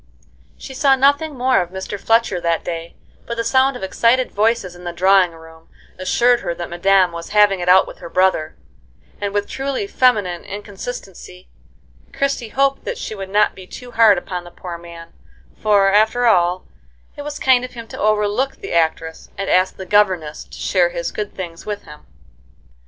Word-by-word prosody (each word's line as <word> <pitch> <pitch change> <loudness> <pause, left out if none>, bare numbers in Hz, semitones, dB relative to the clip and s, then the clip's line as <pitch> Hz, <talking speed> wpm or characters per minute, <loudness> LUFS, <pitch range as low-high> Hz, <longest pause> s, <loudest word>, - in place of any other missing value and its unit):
She 265 - -9
saw 270 0 +3
nothing 285 +2 +2
more 255 -4 +2
of 175 - -5
Mr. 190 +2 -6
Fletcher 225 -5 +1
that 170 -1 0
day, 165 -1 -5 0.3
but 235 - -4
the 230 - -1
sound 265 +2 +2
of - - -10
excited 235 +6 +1
voices 215 -3 0
in 175 - -13
the 175 - -4
drawing 185 0 +3
room 160 0 -16 0.3
assured 240 +6 +3
her 170 - -4
that 175 0 -7
madame 185 +1 +3
was 170 0 -8
having 205 -2 +5
it 175 0 -1
out 190 +1 +6
with - - -12
her - - -9
brother; 185 -4 +1 0.7
and 200 -1 -2
with 205 0 -1
truly 275 +7 -3
feminine 210 - +1
inconsistency 195 -2 -9 0.6
Christie 275 -4 -1
hoped 275 +3 +1
that - - -4
she - - -6
would 195 -2 -7
not 210 +2 +2
be 185 -1 -13
too 250 +4 -10
hard 225 -4 +5
upon 180 0 -5
the 175 - -11
poor 175 0 -8
man, 170 -1 -12 0.4
for, 200 -2 +3
after 220 +4 +3
all, 180 -4 +2 0.5
it - - -7
was 295 0 -6
kind 255 -2 +3
of 250 - -7
him 230 -2 -9
to - - -9
overlook 215 +5 +1
the - - -7
actress, 160 -1 -1
and 195 0 -2
ask 185 +1 +2
the 190 - -7
governess 185 -6 +1
to - - -13
share 180 -3 +1
his 170 -1 -4
good 210 -1 -5
things 170 -2 -8
with 205 -1 -4
him. 150 0 -14
195 Hz, 185 wpm, -19 LUFS, 175-235 Hz, 0.7 s, out